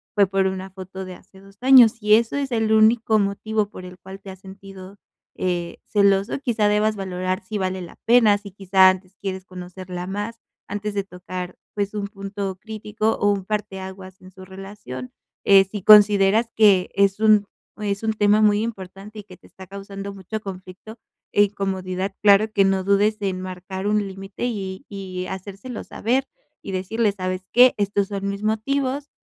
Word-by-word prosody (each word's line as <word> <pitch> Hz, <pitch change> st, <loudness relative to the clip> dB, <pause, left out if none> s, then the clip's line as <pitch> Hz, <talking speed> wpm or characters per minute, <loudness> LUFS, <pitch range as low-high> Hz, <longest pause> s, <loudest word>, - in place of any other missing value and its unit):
fue 205 Hz, -1 st, +5 dB
por 195 Hz, 0 st, +1 dB
una 190 Hz, 0 st, -4 dB
foto 190 Hz, 0 st, -8 dB
de 185 Hz, -1 st, -9 dB
hace 190 Hz, -, -19 dB
2 195 Hz, +1 st, -18 dB
años, 255 Hz, -4 st, +7 dB
si 210 Hz, -2 st, +1 dB
eso 230 Hz, +4 st, +1 dB
es 275 Hz, -2 st, -2 dB
el 225 Hz, -2 st, 0 dB
único 220 Hz, 0 st, +4 dB
motivo 205 Hz, +1 st, -1 dB
por 185 Hz, -, -10 dB
el 180 Hz, 0 st, -11 dB
cual 190 Hz, +1 st, -11 dB
te 195 Hz, -, -11 dB
has 190 Hz, -1 st, -10 dB
sentido, 195 Hz, 0 st, -12 dB, 0.4 s
eh, 175 Hz, -2 st, -3 dB
celoso, 200 Hz, +2 st, +2 dB
quizá 230 Hz, -6 st, 0 dB
debas 210 Hz, +1 st, +1 dB
valorar 185 Hz, 0 st, -3 dB
si 210 Hz, +2 st, -5 dB
vale 185 Hz, -1 st, -2 dB
la 175 Hz, -, -10 dB
pena, 225 Hz, -3 st, +5 dB
si 205 Hz, -1 st, -12 dB
quizá 190 Hz, 0 st, +5 dB
antes 185 Hz, 0 st, -4 dB
quieres 190 Hz, -1 st, -5 dB
conocerla 180 Hz, 0 st, -8 dB
más, 205 Hz, +4 st, -5 dB, 0.3 s
antes 205 Hz, 0 st, -4 dB
de 200 Hz, -1 st, -1 dB
tocar, 180 Hz, -1 st, -7 dB, 0.2 s
pues, 205 Hz, 0 st, -2 dB
un 205 Hz, -1 st, -3 dB
punto 195 Hz, -2 st, -6 dB
crítico 215 Hz, 0 st, -2 dB
o 205 Hz, -, +2 dB
un 195 Hz, -2 st, -2 dB
parte 210 Hz, -2 st, -3 dB
aguas 190 Hz, 0 st, -10 dB
en 185 Hz, -, -14 dB
su 190 Hz, 0 st, -13 dB
relación. 190 Hz, -10 st, -9 dB, 0.3 s
Eh, 195 Hz, -1 st, +7 dB
si 195 Hz, +1 st, -7 dB
consideras 210 Hz, +2 st, +6 dB
que 200 Hz, -4 st, +4 dB
es 200 Hz, +1 st, +2 dB
un 215 Hz, -2 st, +5 dB, 0.3 s
es 205 Hz, -1 st, -3 dB
un 220 Hz, -, +1 dB
tema 210 Hz, 0 st, +3 dB
muy 210 Hz, 0 st, +4 dB
importante 205 Hz, -1 st, -7 dB
y -, -, -8 dB
que 185 Hz, -3 st, -15 dB
te -, -, -20 dB
está 190 Hz, -, -13 dB
causando 195 Hz, +1 st, -8 dB
mucho 200 Hz, +3 st, -6 dB
conflicto 195 Hz, +3 st, -10 dB, 0.3 s
e 205 Hz, -, +5 dB
incomodidad, 190 Hz, -1 st, -3 dB
claro 205 Hz, +1 st, +5 dB
que 200 Hz, -2 st, +3 dB
no 195 Hz, -1 st, +1 dB
dudes 205 Hz, +2 st, +2 dB
en 190 Hz, -2 st, -2 dB
marcar 185 Hz, +1 st, -6 dB
un 210 Hz, -1 st, +1 dB
límite 195 Hz, +1 st, -8 dB
y 195 Hz, -5 st, -4 dB
y 185 Hz, -2 st, -6 dB
hacérselo 195 Hz, +5 st, -7 dB
saber, 260 Hz, +5 st, -1 dB, 0.3 s
y 195 Hz, -, -7 dB
decirle: 205 Hz, +3 st, 0 dB
"¿Sabes 185 Hz, -1 st, -4 dB
qué? 250 Hz, +1 st, +7 dB
Estos 200 Hz, -1 st, 0 dB
son 200 Hz, -1 st, -4 dB
mis 200 Hz, +1 st, -4 dB
motivos. 270 Hz, +6 st, -1 dB
200 Hz, 185 wpm, -22 LUFS, 190-210 Hz, 0.4 s, años